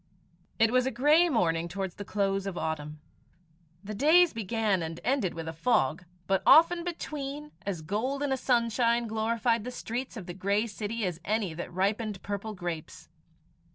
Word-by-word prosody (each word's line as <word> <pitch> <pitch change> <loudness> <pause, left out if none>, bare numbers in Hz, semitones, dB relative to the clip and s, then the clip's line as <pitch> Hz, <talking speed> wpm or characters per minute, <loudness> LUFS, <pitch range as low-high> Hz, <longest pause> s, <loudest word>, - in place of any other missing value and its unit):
It 225 0 +4
was 255 +1 +3
a - - +2
grey 295 +8 +4
morning 170 - +1
towards 190 +1 -4
the 205 - -7
close 195 -1 -1
of 185 -3 -4
autumn. 155 -1 -4 0.8
The 210 +1 -6
days 315 - +5
began 220 -3 0
and 165 0 -5
ended 245 -8 0
with 165 -1 -6
a 160 - -4
fog, 165 - +1 0.2
but 195 +2 +1
often 340 +2 +6
between, 300 -4 -5 0.2
as 175 -6 -3
golden 265 - -1
a 265 - +1
sunshine 235 -1 +2
glorified 230 +1 0
the 250 - -5
streets 250 +1 -5
of 200 - -7
the 175 - -6
grey 200 +4 0
city 220 0 -3
as 175 -2 -4
any 210 -5 -1
that 175 +2 -6
ripened 200 +2 -1
purple 205 +1 -4
grapes. 175 -4 -6
215 Hz, 165 wpm, -29 LUFS, 185-250 Hz, 0.8 s, often